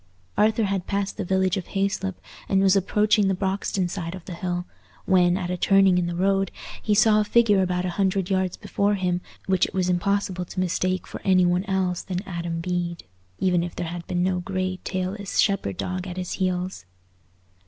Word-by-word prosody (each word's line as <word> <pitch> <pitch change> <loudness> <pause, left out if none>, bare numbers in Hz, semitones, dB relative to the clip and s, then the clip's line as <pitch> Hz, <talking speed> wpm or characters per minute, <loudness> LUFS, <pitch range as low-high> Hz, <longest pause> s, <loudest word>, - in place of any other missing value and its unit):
Arthur 220 +1 +3
had 195 -3 -1
passed 200 -1 -2
the - - -2
village 190 0 +1
of 180 - -5
Hayslope 195 -1 -1 0.3
and 195 - +3
was 190 0 +5
approaching 210 +1 +3
the 190 - +1
Broxton 190 -1 -1
side 175 -1 -4
of 185 - -11
the 185 - -6
hill, 175 0 -3 0.4
when, 180 -1 +4
at 180 -2 -3
a 180 - -2
turning 195 0 +4
in 175 - 0
the 175 - -3
road, 195 +1 +2 0.3
he 210 - +1
saw 215 0 +5
a - - +3
figure 210 -2 +4
about 180 -1 0
a 180 - -1
hundred 190 -1 +1
yards 190 -2 0
before 205 +1 0
him 180 -2 -1 0.2
which 190 -1 +2
it - - -11
was 185 -1 +1
impossible 185 0 0
to 185 - -6
mistake 185 +1 0
for - - -8
any 185 -2 +4
one 180 +2 +1
else 190 -3 0
than 185 0 -4
Adam 170 -2 -3
Bede, 175 -1 -2 0.3
even 180 -2 +2
if 175 - -6
there 170 - -3
had 170 0 -7
been 175 -1 0
no 185 -1 +1
grey, 185 0 -2
tailless 190 +2 -3
shepherd 150 - +1
dog 185 +1 -3
at 180 0 -6
his 180 -1 -4
heels. 180 - -1
185 Hz, 200 wpm, -24 LUFS, 180-195 Hz, 0.4 s, was